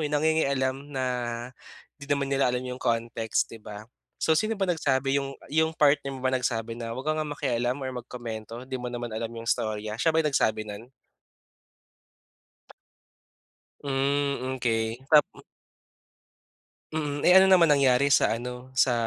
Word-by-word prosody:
yun 150 - -3
nangingialam 140 -4 +1
na 135 -3 -3 1.0
di - - -8
naman 140 -1 0
nila 135 -2 +2
alam 125 - -1
yung 125 0 -6
context, 115 -1 0
'di 115 - -10
ba? 105 0 -9 0.3
So 160 - +2
sino 215 +7 0
ba 195 - +2
nagsabi 135 -6 +1
yung 135 0 -6 0.2
yung 160 +1 +3
partner 140 -1 +3
mo - - -9
ba 130 - +2
nagsabi 115 -3 -1
na, 115 -1 -5
"Wag 135 +3 -6
ka 155 - +2
ngang 155 -1 -2
makialam 125 -2 0
or 130 - -3
magkomento 115 -1 -7
di 130 - -6
mo 125 - -4
naman 120 -1 -5
alam 115 +1 -3
yung 115 0 -8
istorya." 110 -1 -1
Siya 160 - +3
ba - - +5
nagsabi 110 -7 +1
nun? 105 +3 -8 3.0
Hmm. 140 -1 0
Okey. 115 0 -1
Tap 150 -2 +7
m - - -15 1.5
Mm. 145 -2 -3
Eh, - - +6
ano 190 - +6
naman 175 -4 +6
nangyari 140 -1 +4
sa 115 - +4
ano, 125 +1 -7
sa 125 0 +4
130 Hz, 155 wpm, -27 LUFS, 115-145 Hz, 3.0 s, Tap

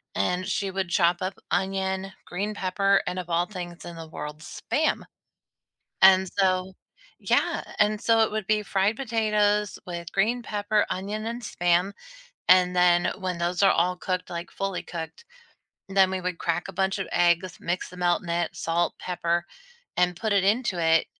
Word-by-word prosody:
And 180 - 0
she 200 0 -1
would 190 -2 -2
chop 175 -1 +3
up 185 +1 -3
onion, 190 0 -1
green 205 +4 -3
pepper, 195 +1 +2
and 180 +1 -2
of 175 -1 -7
all 170 +1 +2
things 175 -4 -8
in 170 -1 -8
the 165 -1 -8
world, 150 0 -7
SPAM. - - -1 1.0
And 190 0 +7
so 185 -1 +2 0.5
yeah - - +1 0.2
and 210 0 +2
so, 225 -1 +3
it 220 - +3
would 215 -2 -3
be 215 -1 +2
fried 200 +2 +1
potatoes 210 -4 +1
with 170 -1 -6
green 230 +5 +1
pepper, 210 0 0
onion, 210 +4 -3
and 235 +1 -4
SPAM. 175 0 +1 0.6
And 180 0 +6
then 175 -1 +4
when 185 -2 -3
those 175 +2 -1
are 195 - +7
all 180 +2 +2
cooked, 185 0 -3
like 170 0 -5
fully 195 -2 -3
cooked, 170 - -7 0.6
then 190 -1 +4
we 190 -1 -2
would 180 -1 -3
crack 170 +1 -1
a 195 - -8
bunch 190 +2 0
of 195 - -3
eggs, 175 +1 +2
mix 175 +2 -2
the 180 - -12
melt 175 -1 +1
in 170 - -8
it, 170 0 -1
salt, 170 +1 0
pepper, 170 -1 -1 0.5
and 180 -1 +2
put 220 +1 -1
it 195 -2 +3
into 205 -3 +1
it, 165 0 +4
185 Hz, 175 wpm, -26 LUFS, 175-200 Hz, 1.0 s, And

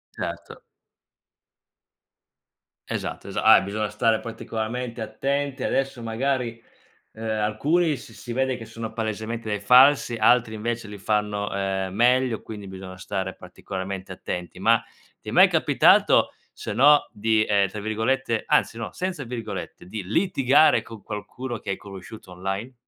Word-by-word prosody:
Certo. - - -6 2.3
Esatto, - - -5
esa - - -3
ah, - - +8
e - - -5
bisogna 105 +2 -2
stare 110 +1 +1
particolarmente 115 +1 -5
attenti 135 +5 -2
adesso 135 -2 -1
magari, 115 0 -2 0.5
ehm, 110 +1 -9 0.2
alcuni 150 +9 +1
s 115 -2 -12
si 120 - -8
vede 130 +1 0
che 115 - -9
sono 115 0 -7
palesemente 110 +1 -4
dei 105 -1 -1
falsi, 125 +4 +5
altri 115 0 +3
invece 115 +1 -3
li 105 -1 -9
fanno, 105 0 -1
ehm, 95 -1 -2
meglio 125 +1 +2
quindi 105 -3 -9
bisogna 95 -1 -9
stare 95 0 -4
particolarmente 95 +1 -7
attenti. 90 -1 -6
Ma 115 +3 +4 0.4
ti - - -7
è - - -8
mai - - +7
capitato - - +4 0.2
se - - -6
no 145 +7 +5
di, 110 +1 +2
ehm, 100 -2 +3
tra 105 +2 -7
virgolette 115 +3 -1
anzi 115 - +2
no, 115 - -5
senza 185 -6 -3
virgolette, 115 -6 -6
di 100 +1 -6
litigare 145 - +3
con 115 -4 -11
qualcuno 115 +4 -6
che - - -6
hai 95 - -1
conosciuto 100 0 -11
online? 95 +7 -4
110 Hz, 145 wpm, -24 LUFS, 100-125 Hz, 2.3 s, ah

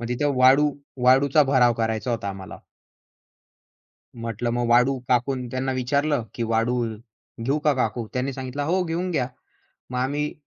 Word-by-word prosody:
मग 120 - -5
तिथं 140 +3 0
वाळू 135 +4 +5 0.3
वाळूचा 135 +3 +5
भराव 130 -3 +4
करायचा 110 +2 -1
होता 105 -4 -2
आम्हाला. 95 -1 -8 1.6
म्हटलं 115 0 -3
मग 120 0 -1
वाळू? 125 +3 +4
काकू 125 +2 +2 0.2
त्यांना 130 +1 -2
विचारलं, 140 +1 0
की 120 - -3
"वाळू 115 +2 +1 0.7
घेऊ 140 +5 +1
का 150 - +4
काकू?" 120 -2 -1
त्यांनी 130 +2 -2
सांगितलं, 130 +2 -5
"हो 180 +5 +1
घेऊन 175 +2 -2
घ्या." 130 -6 0 0.6
मग 125 - -3
आम्ही 145 +3 -1
130 Hz, 150 wpm, -24 LUFS, 120-140 Hz, 1.6 s, वाळू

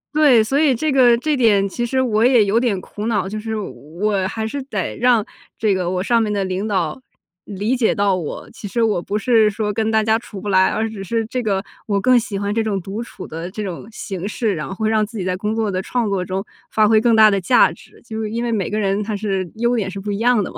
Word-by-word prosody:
对， 275 -8 +6
所 270 +6 0
以 290 -5 +4
这 305 +5 -1
个 245 -3 +5
这 300 +4 0
点 205 -6 +3
其 240 +5 -3
实 260 +2 0
我 225 -4 +2
也 245 -4 +5
有 210 +4 +2
点 225 -7 0
苦 210 +3 -6
恼， 205 -5 0
就 215 +2 -4
是 220 0 -4
我 190 +1 -3
还 220 +2 -4
是 280 +4 -4
得 270 - -4
让 235 -3 +3 0.3
这 215 -3 +2
个 180 -2 -1
我 185 0 -1
上 235 +1 +2
面 215 -2 -1
的 200 -1 0
领 185 +3 -2
导 185 +2 -1 0.4
理 210 +5 -1
解 240 -3 +1
到 200 -2 +2
我。 170 -5 -5
其 205 - -8
实 230 +4 0
我 210 -6 +1
不 205 +4 -2
是 220 -1 +4
说 210 0 -2
跟 220 +1 0
大 220 -1 +2
家 220 +1 +2
处 210 -3 -10
不 205 +2 -5
来， 190 -1 +5
而 225 0 -1
只 210 -3 -7
是 225 +3 -1
这 250 +3 -3
个 195 -3 -1 0.2
我 200 -1 +1
更 255 +3 +4
喜 225 -4 -5
欢 200 +1 -2
这 225 - +1
种 205 -3 -1
独 195 +5 -5
处 235 -5 -9
的 165 +3 -6
这 210 +3 -5
种 190 +1 -6
形 195 -3 -5
式， 215 -2 -1
然 155 -3 -4
后 195 - -5
会 215 +2 -1
让 220 -1 +2
自 220 +1 -6
己 185 - -3
在 185 -1 0
工 210 +3 -2
作 220 -2 0
的 185 0 -1
创 240 +2 -1
作 195 -3 -1
中， 190 +2 -4 0.2
发 215 -1 +3
挥 220 0 +4
更 235 -1 +3
大 215 -1 +7
的 195 -1 0
价 240 +8 +4
值， - - -16
就 220 0 -5
是 215 - -3
因 235 +2 -3
为 235 - -1
每 210 -4 -1
个 215 +1 -1
人 200 0 0
他 210 0 -3
是 195 -4 -2
优 235 +2 +1
点 205 -5 -1
是 195 +1 -6
不 205 +1 -4
一 200 - -3
样 235 -3 +3
的 - - -5
嘛。 - - -9
215 Hz, 295 characters per minute, -20 LUFS, 195-230 Hz, 0.4 s, 大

